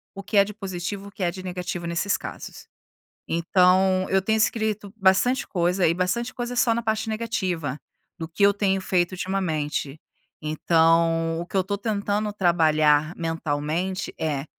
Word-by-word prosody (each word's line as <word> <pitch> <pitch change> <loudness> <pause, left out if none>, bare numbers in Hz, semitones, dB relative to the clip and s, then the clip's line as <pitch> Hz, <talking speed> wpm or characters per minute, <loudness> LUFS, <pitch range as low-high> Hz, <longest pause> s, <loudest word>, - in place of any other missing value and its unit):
o 195 - -7
que 205 +2 -1
é 200 - +8
de 210 +1 -7
positivo 195 0 -5
e - - -9
o - - -11
que 200 -3 -6
é 175 - +1
de 185 +1 -9
negativo 180 -1 -4
nesses 170 +4 0
casos. - - -9 0.6
Então 185 +2 +3
eu 190 0 +3
tenho 220 +3 +1
escrito 215 -2 0
bastante 215 +7 +3
coisa, 180 0 +1
e 165 - +2
bastante 190 +7 -1
coisa 245 0 -4
só 230 -2 +3
na 235 - -2
parte 220 0 -1
negativa 185 - -2 0.4
do 160 -1 -5
que 185 +5 -4
eu 200 0 +7
tenho 195 -2 +1
feito 180 -1 0
ultimamente. 160 -6 -2 0.4
Então 165 +1 +2
o 175 - -5
que 195 - -5
eu - - +5
estou 200 +2 -3
tentando 210 0 -1
trabalhar 155 -4 +3
mentalmente 165 +2 -2
é: 145 -3 -1
185 Hz, 170 wpm, -24 LUFS, 165-200 Hz, 0.6 s, é